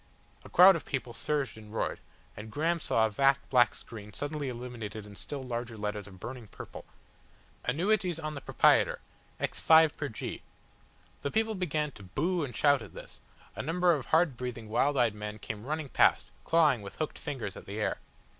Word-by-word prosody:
A - - -12
crowd 185 +2 +8
of 165 - -4
people 125 -3 -4
surged 140 -2 -2
and 105 -1 -13
roared, 110 - -2 0.4
and 105 +2 -8
Graham 165 +8 0
saw 115 -7 +2
a - - 0
vast 135 +5 +4
black 120 -3 +5
screen 105 -2 -9
suddenly 145 - -3
illuminated 115 -4 -6
in 105 0 -12
still 140 +6 -6
larger 120 -2 -4
letters 105 0 -3
of 95 -2 -13
burning 120 +2 -7
purple. - - -10 0.8
"Anuetes 180 +5 +1
on 155 -1 -4
the 140 - -6
Propraiet'r - - +4 0.4
x - - -2
5 160 -1 +6
pr. 145 - -3
G." 110 - -6 0.8
The 140 - -1
people 220 +5 +1
began 155 -6 -1
to 105 - -14
boo 155 - -1
and 125 -4 -5
shout 145 -2 +4
at - - -11
this, - - -10 0.3
a - - -3
number 175 +2 +2
of 140 -5 -3
hard 160 -4 +3
breathing, 120 -3 -5
wild 140 +6 +2
eyed 120 -4 +3
men 105 0 -6
came 110 +2 -7
running 155 0 -2
past, - - +3
clawing 155 -8 +4
with 100 -1 -9
hooked 155 - -3
fingers 125 - -5
at - - -11
the 100 +2 -5
air. 105 - -1
130 Hz, 190 wpm, -30 LUFS, 110-155 Hz, 0.8 s, crowd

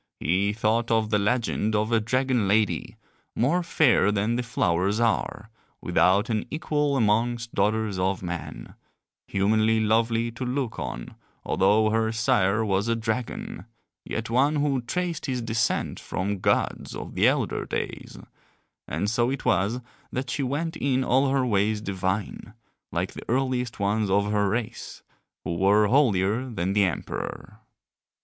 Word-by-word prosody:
He 95 +5 +1
thought 110 +2 0
of 110 -1 +1
the 105 - +3
legend 110 0 0
of 105 +2 0
a 115 - +4
dragon 125 -1 +1
lady, 105 +1 +1 0.4
more 145 +10 +2
fair 145 - +3
than 105 +3 0
the 125 - 0
flowers 100 -3 0
are, 115 -1 -1 0.3
without 100 +4 +2
an 110 -1 0
equal 150 -3 0
amongst 115 +1 +1
daughters 105 -1 0
of 95 +1 0
men, 85 -9 -6 0.5
humanly 110 +3 +2
lovely 115 +1 +1
to 120 +3 -6
look 125 -1 -2
on - - -5 0.3
although 105 +3 +3
her 110 0 +1
sire 105 -1 +2
was 100 +1 0
a 115 - +2
dragon, 115 +1 -4 0.4
yet 115 0 -4
one 135 +6 +2
who 145 -3 +1
traced 170 +6 -3
his 130 -2 -1
descent 115 0 -1
from 100 +2 -3
gods - - 0
of - - -7
the - - +3
elder - - 0
days, - - -5 0.7
and 100 - -2
so 120 +3 +1
it 135 0 -4
was 100 +8 +1 0.3
that 130 -1 -3
she - - -2
went 145 +5 -2
in 130 -1 +1
all 135 +2 +3
her 135 -1 +1
ways 105 -1 +1
divine, 100 +2 -3 0.4
like - - -2
the - - -11
earliest 125 -2 -1
ones 105 +1 0
of 100 +2 +2
her 105 -1 +2
race, 115 +2 -4 0.4
who 85 - -3
were 100 +3 +4
holier 115 -1 +2
than 95 -4 -2
the 100 -1 +4
emperor. 90 - -5
110 Hz, 150 wpm, -25 LUFS, 100-125 Hz, 0.7 s, a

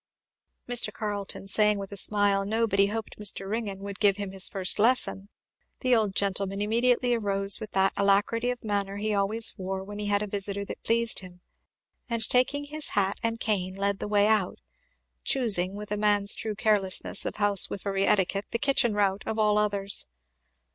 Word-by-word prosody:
Mr. 245 -1 +2
Carleton 205 -2 -4
saying 210 +1 +2
with 195 0 -7
a - - -7
smile 200 -1 +3
"No, 220 +3 0
but 200 -3 -2
he 200 - +5
hoped 220 +1 -6
Mr. 200 -2 -1
Ringgan 205 -2 -4
would 200 0 -7
give 205 -2 +3
him 200 -2 -5
his 190 -1 +1
first 190 +1 0
lesson," 220 -3 +1 0.5
the 255 -2 +3
old 210 -4 0
gentleman 195 0 -1
immediately 240 +3 +1
arose 200 -3 +1
with 215 -2 -7
that 190 0 +2
alacrity 205 +4 +1
of 245 -1 -5
manner 200 -2 -2
he 215 +1 -2
always 205 +3 0
wore 190 0 -4
when 205 +1 -9
he 210 - -4
had 205 0 +1
a - - -2
visitor 200 0 -2
that - - -8
pleased 230 0 +1
him, 180 -1 -13 0.7
and 230 -2 +3
taking 255 +3 +2
his 300 +1 -2
hat 195 0 +1
and 230 0 -2
cane 190 -5 -1
led 200 0 -1
the - - -4
way 205 -1 +2
out; 210 -4 +1 0.7
choosing, 200 -8 0
with 210 0 -8
a 210 - 0
man's 205 -1 +4
true 215 -1 -4
carelessness 205 -4 0
of - - -4
housewifery 200 -1 +1
etiquette, 195 +1 +1
the - - -2
kitchen 270 -4 +1
route, 200 -1 0
of 220 - -3
all 210 -1 +2
others. 200 - +1
205 Hz, 185 wpm, -27 LUFS, 195-220 Hz, 0.7 s, he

